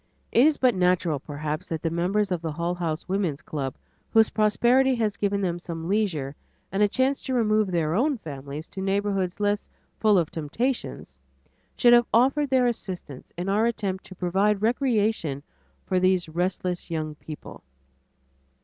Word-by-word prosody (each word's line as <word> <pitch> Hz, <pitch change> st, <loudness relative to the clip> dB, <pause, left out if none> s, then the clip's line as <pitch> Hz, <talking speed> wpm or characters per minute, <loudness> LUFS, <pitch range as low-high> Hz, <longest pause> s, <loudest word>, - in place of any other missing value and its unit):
It 245 Hz, +6 st, +6 dB
is 310 Hz, -, +2 dB
but 255 Hz, -2 st, +3 dB
natural, 180 Hz, -5 st, +1 dB
perhaps, 150 Hz, +4 st, -5 dB
that 160 Hz, -1 st, -3 dB
the 165 Hz, -, 0 dB
members 190 Hz, +4 st, 0 dB
of 175 Hz, -3 st, -1 dB
the 165 Hz, -2 st, -3 dB
Hull 170 Hz, +3 st, -1 dB
House 165 Hz, -3 st, -3 dB
Woman's 185 Hz, -7 st, -1 dB
Club 135 Hz, -4 st, -4 dB, 0.3 s
whose 225 Hz, -1 st, +4 dB
prosperity 245 Hz, +5 st, +3 dB
has 220 Hz, -3 st, 0 dB
given 200 Hz, 0 st, 0 dB
them 175 Hz, -2 st, -1 dB
some 165 Hz, -1 st, -6 dB
leisure 175 Hz, -9 st, 0 dB, 0.4 s
and 195 Hz, -, 0 dB
a 210 Hz, -, +6 dB
chance 260 Hz, +6 st, +1 dB
to 260 Hz, -, -2 dB
remove 215 Hz, -3 st, +2 dB
their 165 Hz, -3 st, 0 dB
own 265 Hz, -, +2 dB
families 145 Hz, -3 st, -7 dB
to 190 Hz, -, -6 dB
neighborhoods 195 Hz, -1 st, -1 dB
less 205 Hz, 0 st, 0 dB, 0.3 s
full 215 Hz, -2 st, +4 dB
of 170 Hz, -4 st, +1 dB
temptations, 230 Hz, -, -3 dB, 0.6 s
should 240 Hz, -2 st, +6 dB
have 240 Hz, 0 st, +6 dB
offered 275 Hz, +5 st, +3 dB
their 260 Hz, -1 st, +3 dB
assistance 185 Hz, -, -4 dB
in 175 Hz, +2 st, -3 dB
our 210 Hz, +4 st, +2 dB
attempt 200 Hz, -5 st, -2 dB
to 185 Hz, -, -11 dB
provide 195 Hz, +4 st, +1 dB
recreation 220 Hz, -, +1 dB, 0.4 s
for 185 Hz, -, +1 dB
these 185 Hz, -1 st, +2 dB
restless 180 Hz, +2 st, -2 dB
young 155 Hz, -2 st, -3 dB
people. 150 Hz, 0 st, -10 dB
190 Hz, 165 wpm, -25 LUFS, 165-220 Hz, 0.6 s, It